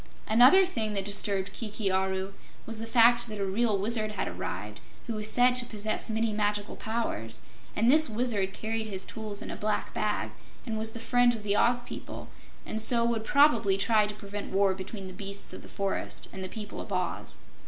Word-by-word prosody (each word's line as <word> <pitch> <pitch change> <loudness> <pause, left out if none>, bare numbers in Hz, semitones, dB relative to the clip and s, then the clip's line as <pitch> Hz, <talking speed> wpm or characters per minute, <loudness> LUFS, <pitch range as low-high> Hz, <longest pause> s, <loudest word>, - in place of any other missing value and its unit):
Another 255 - +7
thing 225 - -2
that 195 -1 -2
disturbed 200 -1 0
Kiki 210 -3 -3
Aru 190 +1 -1 0.3
was 225 -1 -7
the 225 - -5
fact 235 0 +4
that 215 - -6
a 200 - -1
real 210 +2 +1
Wizard 215 +1 +1
had 205 - -2
arrived, 100 +4 -5 0.3
who 235 - -3
was 215 0 0
said 250 +1 +4
to 250 - +4
possess 215 0 -3
many 220 0 0
magical 205 0 -1
powers, 115 - -4 0.3
and 230 +3 +4
this 310 -1 +7
Wizard 215 -4 0
carried 220 +2 -3
his 195 -3 -3
tools 215 -2 -6
in - - -6
a - - -5
black 210 0 -2
bag, 205 - -1 0.3
and 220 - -3
was 220 0 -3
the 230 - -7
friend 245 +1 +3
of 215 - -9
the 205 -1 +1
Oz 245 +3 +2
people, - - -8 0.4
and 220 - 0
so 235 +1 +5
would 230 -2 0
probably 230 -8 +4
try 210 +1 +3
to 210 - -6
prevent 205 0 -7
war 195 0 +3
between 190 +1 -7
the 185 - -8
beasts 200 +1 -5
of - - -8
the - - -12
forest 195 -1 -2
and 190 - -6
the 185 - -5
people 210 0 -7
of - - -10
Oz. 180 -2 -2
215 Hz, 205 wpm, -28 LUFS, 195-230 Hz, 0.4 s, Another